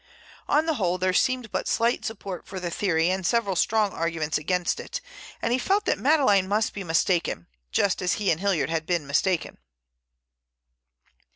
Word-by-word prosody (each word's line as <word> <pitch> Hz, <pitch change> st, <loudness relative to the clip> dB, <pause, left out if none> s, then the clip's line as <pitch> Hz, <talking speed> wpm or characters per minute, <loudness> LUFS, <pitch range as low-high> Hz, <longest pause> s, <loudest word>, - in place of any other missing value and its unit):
On 300 Hz, +2 st, +3 dB
the 325 Hz, -, +1 dB
whole 185 Hz, -, 0 dB
there 185 Hz, 0 st, 0 dB
seemed 250 Hz, +1 st, +1 dB
but -, -, -2 dB
slight 235 Hz, +1 st, +1 dB
support 200 Hz, -4 st, -6 dB
for 190 Hz, -, -6 dB
the 175 Hz, -1 st, -4 dB
theory 165 Hz, -2 st, +1 dB
and 190 Hz, 0 st, -2 dB
several 200 Hz, 0 st, +1 dB
strong 210 Hz, +2 st, +2 dB
arguments 165 Hz, -2 st, -2 dB
against 180 Hz, +3 st, 0 dB
it, -, -, -5 dB, 0.4 s
and 235 Hz, -, +1 dB
he 255 Hz, -, +2 dB
felt 400 Hz, -, +1 dB
that -, -, +1 dB
Madeleine 260 Hz, -11 st, +3 dB
must 210 Hz, +2 st, 0 dB
be 200 Hz, -, -5 dB
mistaken, 165 Hz, -, 0 dB, 0.3 s
just 195 Hz, -, +1 dB
as 180 Hz, -1 st, +1 dB
he 205 Hz, -2 st, +1 dB
and 160 Hz, -, 0 dB
Hilliard 195 Hz, -5 st, +1 dB
had 165 Hz, -1 st, -2 dB
been 175 Hz, -4 st, 0 dB
mistaken. 170 Hz, +5 st, 0 dB
190 Hz, 175 wpm, -25 LUFS, 170-220 Hz, 0.4 s, On